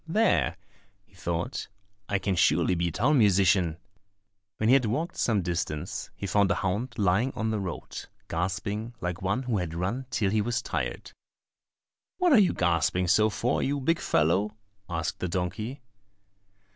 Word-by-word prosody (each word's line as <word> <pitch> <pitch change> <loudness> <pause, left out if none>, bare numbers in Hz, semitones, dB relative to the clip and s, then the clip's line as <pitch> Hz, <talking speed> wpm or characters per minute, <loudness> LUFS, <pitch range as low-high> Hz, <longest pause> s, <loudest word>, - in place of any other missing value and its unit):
"There," 165 - +2 0.5
he 100 - -32
thought, 85 -2 -3 0.4
"I 100 - +2
can 95 0 -1
surely 85 +2 +3
be 85 0 0
town 130 - +2
musician." 95 -5 +3 0.8
When 110 - 0
he 125 - +6
had 135 -3 +5
walked 155 - -2
some 105 -5 +1
distance, 85 -3 -3
he - - -6
found 100 +1 +2
a 100 - +2
hound 105 +6 -2
lying 105 +5 +2
on 110 0 -1
the 110 - -1
road, 90 -5 -6 0.2
gasping 100 +6 -3
like 90 +1 -3
one 100 +8 0
who 120 -5 0
had 85 -2 -4
run 105 +10 -2
till 100 -6 0
he 110 0 +2
was 120 +2 -1
tired. - - -3 1.1
"What 360 -4 +4
are 240 - +8
you 195 - +4
gasping 90 +1 +1
so 110 +4 +4
for, 120 +5 0
you 140 +1 0
big 165 +5 +1
fellow?" 90 +7 +1 0.3
asked 80 -1 -3
the 90 - -2
donkey. 105 +9 -3
100 Hz, 160 wpm, -27 LUFS, 90-120 Hz, 1.1 s, are